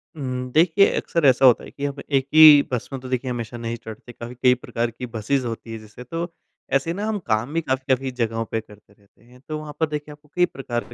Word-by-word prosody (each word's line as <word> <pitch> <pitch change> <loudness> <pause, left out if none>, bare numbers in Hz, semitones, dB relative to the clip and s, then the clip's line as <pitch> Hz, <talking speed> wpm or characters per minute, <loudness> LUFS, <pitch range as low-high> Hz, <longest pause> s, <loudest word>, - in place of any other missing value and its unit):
हुँ, 125 -3 -4
देखिए, 170 +6 +5
अक्सर 170 -3 0
ऐसा 130 +1 +5
होता 125 - +6
है - - -11
कि 140 - -5
हम 140 0 -3
एक 135 -1 +2
ही 155 -2 +10
बस 125 -3 -3
में 135 - -3
तो 130 - -8
देखिए 130 0 -2
हमेशा 120 0 -5
नहीं 115 0 -4
चढ़ते। 110 +2 -9
काफ़ी 120 +1 -9
कई 125 0 +4
प्रकार 120 -1 -3
की 120 +3 -7
बसिज़ 125 +3 -1
होती 115 0 -6
हैं, 115 - -6
जैसे 110 +3 -12
तो, 165 +6 -5 0.4
ऐसे 135 +5 +1
ना 200 +4 -3
हम 215 -1 -1
काम 115 +6 0
भी 165 - +1
काफ़ी-काफ़ी 130 -2 -1
जगहों 115 -2 -2
पे 115 - -3
करते 105 -1 -19
रहते 100 +2 -29
हैं। 125 +1 -19
तो 155 - -2
वहाँ 150 -1 -8
पर 160 - +3
देखिए 150 0 -5
आपको 150 0 -15
कई 180 0 +4
प्रकार 120 -5 -5
125 Hz, 240 wpm, -23 LUFS, 115-150 Hz, 0.4 s, ही